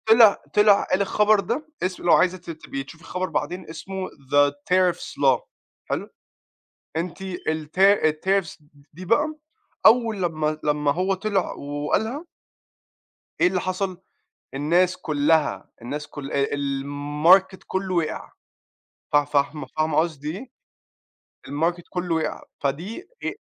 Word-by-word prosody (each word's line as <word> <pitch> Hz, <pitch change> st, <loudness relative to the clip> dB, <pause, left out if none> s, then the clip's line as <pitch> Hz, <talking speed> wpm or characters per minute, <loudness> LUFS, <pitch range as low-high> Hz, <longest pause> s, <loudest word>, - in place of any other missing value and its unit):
طِلع 225 Hz, -2 st, +8 dB, 0.2 s
طِلع 210 Hz, -1 st, +6 dB
قال 185 Hz, -, 0 dB
الخبر 210 Hz, +1 st, +3 dB
ده 245 Hz, -, -3 dB, 0.2 s
اسم 185 Hz, 0 st, -2 dB
لو 170 Hz, -, +5 dB
عايزة 185 Hz, +1 st, +4 dB
ت 175 Hz, 0 st, -10 dB
تبقي 145 Hz, -4 st, -6 dB
تشوفي 160 Hz, +4 st, -14 dB
الخبر 185 Hz, +1 st, -3 dB
بعدين 165 Hz, +3 st, -3 dB
اسمه 190 Hz, +4 st, -6 dB
The 145 Hz, +1 st, +2 dB, 0.2 s
Tariffs 185 Hz, -1 st, +2 dB
law -, -, +5 dB, 0.4 s
حلو؟ -, -, -3 dB, 0.9 s
أنتِ 175 Hz, +3 st, -3 dB
الت 160 Hz, -3 st, -4 dB
الtariffs 190 Hz, -1 st, +3 dB
د 150 Hz, -, -26 dB, 0.2 s
دي 180 Hz, +4 st, -9 dB
بقى 295 Hz, -, +2 dB, 0.5 s
أول 225 Hz, -4 st, +4 dB
لمّا 155 Hz, -2 st, -1 dB
لمّا 150 Hz, -1 st, +1 dB
هو 185 Hz, +4 st, 0 dB
طِلع 195 Hz, -1 st, -1 dB
وقالها 185 Hz, -, -2 dB, 1.2 s
إيه -, -, +6 dB
اللي 180 Hz, 0 st, +1 dB
حصل؟ 185 Hz, 0 st, -3 dB, 0.5 s
الناس 175 Hz, +6 st, +2 dB
كلها 155 Hz, -1 st, +1 dB
الناس 145 Hz, +5 st, -5 dB
ك -, -, -18 dB
آآ 140 Hz, 0 st, -1 dB
الماركت 145 Hz, +7 st, +2 dB
كله 190 Hz, -1 st, -2 dB
وقع. 165 Hz, -2 st, -2 dB, 0.8 s
فا 145 Hz, 0 st, +5 dB
فاهمة 145 Hz, +1 st, -1 dB
فاهمة 155 Hz, -1 st, +1 dB
قصدي 155 Hz, 0 st, -1 dB
إيه؟ 260 Hz, +3 st, -9 dB, 1.0 s
الماركت 165 Hz, +4 st, -1 dB
كله 180 Hz, -2 st, -2 dB
وقع 160 Hz, -1 st, -2 dB, 0.2 s
فدي 175 Hz, -, -3 dB, 0.2 s
ه -, -, 0 dB
175 Hz, 130 wpm, -24 LUFS, 150-190 Hz, 1.2 s, طِلع